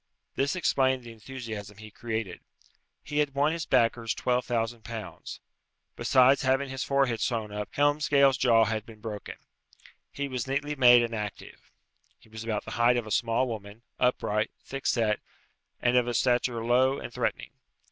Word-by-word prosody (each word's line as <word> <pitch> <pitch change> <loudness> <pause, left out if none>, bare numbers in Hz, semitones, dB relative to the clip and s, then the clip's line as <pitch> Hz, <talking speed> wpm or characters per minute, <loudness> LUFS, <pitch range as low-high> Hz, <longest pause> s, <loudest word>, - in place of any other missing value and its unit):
This 140 +6 0
explained 130 -7 +1
the 120 - -10
enthusiasm 110 -3 -8
he 110 0 -11
created. 110 -4 -4 0.6
He 150 0 -2
had 145 -2 0
won 145 +2 +3
his 165 -1 -4
backers 115 -1 +2
twelve 125 0 0
thousand 115 -1 -2
pounds. 105 -7 -8 0.5
Besides 130 +1 +4
having 135 +1 +1
his 135 0 -3
forehead 135 -4 +1
sewn 110 -4 -1
up 105 0 -5
Helmsgail's 145 -2 +3
jaw 115 -3 +5
had 110 -1 -2
been 110 -1 -14
broken. 105 -1 -7 0.8
He 140 0 -3
was 130 -3 -4
neatly 145 +2 -2
made 125 -3 +7
and 115 0 -3
active. 105 -2 -7 0.5
He - - -23
was 110 0 -8
about 110 -2 -3
the 110 - -7
height 120 +1 +5
of 120 - -2
a 110 - -8
small 115 +3 +1
woman, 110 -1 -7 0.2
upright, 110 -4 +1
thick 135 0 -5
set, 110 -3 +1 0.6
and 125 0 +3
of 125 -1 +3
a 120 - -2
stature 120 -2 +1
low 130 +3 +3
and - - -8
threatening. - - -2
120 Hz, 165 wpm, -28 LUFS, 110-135 Hz, 0.8 s, made